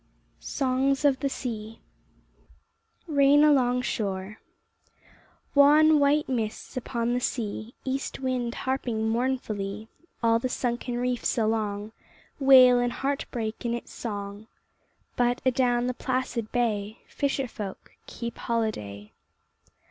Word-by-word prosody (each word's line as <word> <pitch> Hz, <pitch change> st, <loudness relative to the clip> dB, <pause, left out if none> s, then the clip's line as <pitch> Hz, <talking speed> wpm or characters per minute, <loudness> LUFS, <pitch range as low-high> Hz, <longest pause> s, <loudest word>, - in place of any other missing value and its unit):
SONGS 270 Hz, +1 st, 0 dB
OF 275 Hz, -2 st, +4 dB
THE 280 Hz, -, 0 dB
SEA 225 Hz, -4 st, -6 dB, 1.3 s
RAIN 290 Hz, -2 st, +5 dB
ALONG 250 Hz, -4 st, +3 dB
SHORE 200 Hz, -2 st, -3 dB, 1.1 s
Wan 300 Hz, +2 st, +6 dB
white 290 Hz, +1 st, +3 dB
mists 230 Hz, -1 st, -3 dB
upon 240 Hz, -1 st, -2 dB
the 245 Hz, -, +1 dB
sea, 230 Hz, -2 st, -3 dB
East 265 Hz, +1 st, -3 dB
wind 255 Hz, -2 st, -2 dB
harping 240 Hz, -4 st, -1 dB
mournfully 220 Hz, -4 st, -2 dB, 0.3 s
All 230 Hz, 0 st, +4 dB
the 255 Hz, -, -2 dB
sunken 245 Hz, 0 st, -2 dB
reefs 245 Hz, 0 st, -1 dB
along, 215 Hz, -2 st, -1 dB, 0.5 s
Wail 255 Hz, -3 st, +7 dB
and 245 Hz, 0 st, 0 dB
heart 275 Hz, +1 st, -2 dB
break 225 Hz, -2 st, -4 dB
in 235 Hz, -1 st, -1 dB
its 240 Hz, -, -8 dB
song, 205 Hz, -1 st, -6 dB, 0.7 s
But 245 Hz, 0 st, +1 dB
adown 245 Hz, -2 st, +2 dB
the 250 Hz, -, -1 dB
placid 255 Hz, -3 st, -2 dB
bay 220 Hz, -3 st, -1 dB
Fisher 275 Hz, -2 st, -1 dB
folk 205 Hz, -4 st, -8 dB, 0.2 s
keep 235 Hz, -1 st, -6 dB
holiday. 105 Hz, -, -3 dB
245 Hz, 115 wpm, -27 LUFS, 220-265 Hz, 1.3 s, Wail